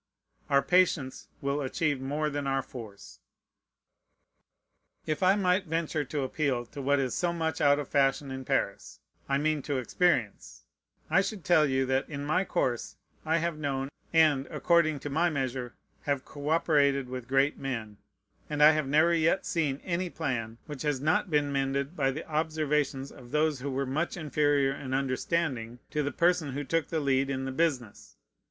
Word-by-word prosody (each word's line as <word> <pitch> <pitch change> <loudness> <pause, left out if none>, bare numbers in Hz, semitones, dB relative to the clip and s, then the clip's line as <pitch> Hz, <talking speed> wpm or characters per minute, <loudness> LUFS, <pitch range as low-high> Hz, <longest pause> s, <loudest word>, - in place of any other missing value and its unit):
Our 140 -1 +4
patience 180 -7 +1
will 140 +1 -1
achieve 145 0 -1
more 150 +3 -1
than 145 -1 -3
our 135 -1 0
force. 110 -6 -11 1.9
If 155 -1 -2
I 185 +1 +5
might 185 -1 +1
venture 160 -1 -1
to 140 +1 -3
appeal 130 -3 -1
to 140 +4 -8
what 140 +1 +2
is 130 -2 -1
so 175 -1 0
much 160 -2 -2
out 145 -1 +5
of 145 -2 -4
fashion 135 0 +1
in 130 0 -5
Paris, - - -2 0.3
I 140 - +2
mean 155 0 0
to 140 0 -2
experience, 130 - 0 0.5
I 190 - +5
should 195 -2 -5
tell 160 -4 +5
you, 130 -1 +1
that 130 +1 0
in 145 -1 -5
my 155 +6 +2
course 125 -11 -1 0.3
I 160 +1 +3
have 170 -2 -2
known, 135 -2 -2 0.2
and, 155 -4 +4
according 155 -4 +2
to 145 - -5
my 165 +4 +2
measure, 130 -4 -3 0.3
have 140 -2 -1
coöperated 145 -2 +1
with 125 -1 -7
great 135 +3 +2
men; 115 -6 -4 0.5
and 150 -1 +2
I 155 - +9
have 155 -3 -1
never 155 +4 +4
yet 165 +3 +2
seen 145 -5 -1
any 180 0 -2
plan 115 -9 -3
which 150 -3 -7
has 150 -3 0
not 160 +8 +1
been 145 -2 +1
mended 140 +3 -1
by 135 -5 +1
the 145 +4 -5
observations 150 -3 -1
of 120 -2 -13
those 150 -1 +1
who 140 +3 -4
were 135 +1 -1
much 155 +8 -2
inferior 145 -3 +1
in 130 -1 -4
understanding 130 -3 -1
to 150 - 0
the 145 0 -1
person 170 -5 +1
who 145 +2 -3
took 165 +2 0
the 160 - -1
lead 135 -1 +1
in 135 -1 -2
the 135 - -3
business. 130 -7 -2
145 Hz, 175 wpm, -29 LUFS, 135-160 Hz, 1.9 s, I